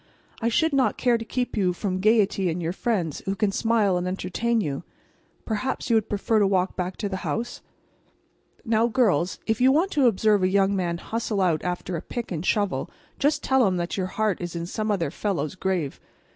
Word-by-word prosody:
I 230 Hz, -, +2 dB
should 320 Hz, +6 st, +2 dB
not 270 Hz, -2 st, +2 dB
care 240 Hz, -2 st, +2 dB
to -, -, -4 dB
keep 250 Hz, +2 st, -3 dB
you 185 Hz, -4 st, +2 dB
from 185 Hz, 0 st, -2 dB
gayety 200 Hz, -2 st, +3 dB
and 165 Hz, +2 st, -2 dB
your 170 Hz, 0 st, -2 dB
friends 185 Hz, -, -1 dB
who 195 Hz, -, 0 dB
can 210 Hz, -1 st, +1 dB
smile 215 Hz, -3 st, +2 dB
and 180 Hz, 0 st, -2 dB
entertain 195 Hz, +6 st, -1 dB
you. 145 Hz, -9 st, -2 dB, 0.6 s
Perhaps 240 Hz, +3 st, -2 dB
you -, -, +5 dB
would 220 Hz, -1 st, +1 dB
prefer 215 Hz, +1 st, +1 dB
to 205 Hz, -, +4 dB
walk 190 Hz, -1 st, +1 dB
back 180 Hz, 0 st, -3 dB
to 210 Hz, -, -2 dB
the 190 Hz, -1 st, -3 dB
house?" 235 Hz, +5 st, -3 dB, 1.0 s
Now, 225 Hz, 0 st, +3 dB
girls, 210 Hz, -, +2 dB
if 220 Hz, +1 st, 0 dB
you 260 Hz, +1 st, +6 dB
want 340 Hz, +8 st, +2 dB
to 280 Hz, -4 st, +4 dB
observe 215 Hz, -2 st, +3 dB
a 185 Hz, -, +3 dB
young 195 Hz, +1 st, +2 dB
man 175 Hz, -3 st, -1 dB
hustle 225 Hz, +2 st, -3 dB
out 175 Hz, -5 st, +1 dB
after 180 Hz, 0 st, -3 dB
a 165 Hz, -, -3 dB
pick 235 Hz, +4 st, -6 dB
and 165 Hz, -2 st, -3 dB
shovel, 205 Hz, 0 st, 0 dB, 0.3 s
just 290 Hz, +2 st, +1 dB
tell 265 Hz, -4 st, +3 dB
him 185 Hz, -1 st, 0 dB
that 175 Hz, 0 st, -2 dB
your 185 Hz, -2 st, -1 dB
heart 210 Hz, -1 st, -1 dB
is 175 Hz, -1 st, -5 dB
in 170 Hz, 0 st, -3 dB
some 215 Hz, +4 st, -3 dB
other 170 Hz, -8 st, 0 dB
fellow's 175 Hz, -6 st, -2 dB
grave. 185 Hz, -6 st, -2 dB
200 Hz, 210 wpm, -25 LUFS, 180-230 Hz, 1.0 s, you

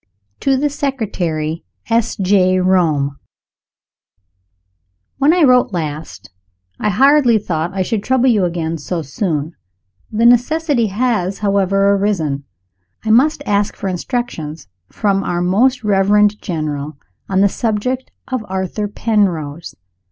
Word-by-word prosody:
To 270 Hz, -1 st, +1 dB
the 290 Hz, +2 st, 0 dB
Secretary, 180 Hz, -, -3 dB, 0.2 s
S. 230 Hz, 0 st, +1 dB
J., 185 Hz, -2 st, +2 dB
Rome. 160 Hz, -7 st, +1 dB, 2.0 s
WHEN 285 Hz, +3 st, +4 dB
I 350 Hz, -1 st, +3 dB
wrote 250 Hz, -6 st, +4 dB
last, 155 Hz, -2 st, -5 dB, 0.5 s
I 210 Hz, -, 0 dB
hardly 265 Hz, +1 st, +4 dB
thought 170 Hz, -4 st, -2 dB
I 190 Hz, -, +1 dB
should 210 Hz, +2 st, -2 dB
trouble 260 Hz, 0 st, +2 dB
you 220 Hz, -6 st, +3 dB
again 165 Hz, -2 st, -2 dB
so 165 Hz, +3 st, -4 dB
soon. 155 Hz, +1 st, -3 dB, 0.6 s
The 225 Hz, +2 st, +1 dB
necessity 245 Hz, +1 st, +3 dB
has, 200 Hz, -3 st, -1 dB
however, 195 Hz, -1 st, +2 dB
arisen. 165 Hz, -9 st, -1 dB, 0.6 s
I 220 Hz, -, +1 dB
must 285 Hz, +6 st, +3 dB
ask 205 Hz, 0 st, 0 dB
for 195 Hz, -, -4 dB
instructions, 175 Hz, -, -4 dB, 0.2 s
from 195 Hz, -2 st, 0 dB
our 175 Hz, -2 st, -2 dB
Most 245 Hz, +8 st, +2 dB
Reverend 210 Hz, +1 st, +3 dB
General, 155 Hz, -4 st, -4 dB, 0.3 s
on 190 Hz, 0 st, +2 dB
the 200 Hz, -, +5 dB
subject 235 Hz, +5 st, -2 dB, 0.2 s
of 255 Hz, -4 st, -3 dB
Arthur 190 Hz, +2 st, -2 dB
Penrose. 175 Hz, -8 st, -1 dB
200 Hz, 120 wpm, -17 LUFS, 170-235 Hz, 2.0 s, the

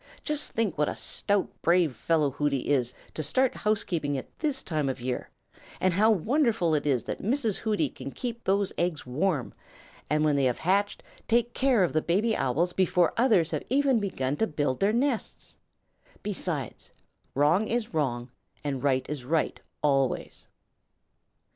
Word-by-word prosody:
Just 300 Hz, -1 st, -1 dB
think 210 Hz, -9 st, -1 dB
what 150 Hz, -, +2 dB
a -, -, -4 dB
stout, 205 Hz, -1 st, 0 dB
brave 170 Hz, -5 st, +3 dB
fellow 155 Hz, +3 st, +1 dB
Hooty 140 Hz, -1 st, 0 dB
is 125 Hz, -4 st, +1 dB, 0.2 s
to -, -, -3 dB
start 255 Hz, -, +2 dB
housekeeping 170 Hz, -9 st, 0 dB
at 130 Hz, -, -5 dB
this 295 Hz, -4 st, 0 dB
time 155 Hz, -5 st, -1 dB
of 130 Hz, -, -3 dB
year, 125 Hz, 0 st, -3 dB, 0.5 s
and 185 Hz, -1 st, +2 dB
how 210 Hz, +5 st, +4 dB
wonderful 220 Hz, -, +2 dB
it 150 Hz, -1 st, 0 dB
is 130 Hz, -4 st, +2 dB
that -, -, -5 dB
Mrs. 225 Hz, -1 st, 0 dB
Hooty 210 Hz, -9 st, 0 dB
can 135 Hz, +1 st, -8 dB
keep 235 Hz, -, -5 dB
these 195 Hz, 0 st, +1 dB
eggs 175 Hz, -3 st, -1 dB
warm 145 Hz, +2 st, -1 dB, 0.6 s
and 150 Hz, +1 st, +2 dB
when 150 Hz, -2 st, +3 dB
they 140 Hz, -1 st, +2 dB
have 125 Hz, -2 st, +1 dB
hatched 200 Hz, +4 st, 0 dB, 0.2 s
take 235 Hz, +1 st, +2 dB
care 255 Hz, -6 st, +3 dB
of 175 Hz, -, 0 dB
the 155 Hz, -, +2 dB
baby 210 Hz, +8 st, +1 dB
Owls 165 Hz, +8 st, 0 dB
before 180 Hz, -2 st, +2 dB
others 215 Hz, -10 st, +3 dB
have -, -, -1 dB
even 270 Hz, -1 st, +3 dB
begun 145 Hz, -10 st, -2 dB
to 225 Hz, -, +1 dB
build 145 Hz, -4 st, -1 dB
their 200 Hz, +2 st, +3 dB
nests. 245 Hz, 0 st, -2 dB, 0.7 s
Besides, 175 Hz, -, -3 dB, 0.5 s
wrong 155 Hz, +10 st, +3 dB
is 230 Hz, -4 st, -2 dB
wrong 125 Hz, -5 st, -1 dB, 0.3 s
and 140 Hz, -3 st, -2 dB
right 130 Hz, -2 st, +1 dB
is 150 Hz, -4 st, -4 dB
right, 155 Hz, +5 st, 0 dB, 0.2 s
always." 135 Hz, -3 st, 0 dB
170 Hz, 165 wpm, -27 LUFS, 145-215 Hz, 0.7 s, how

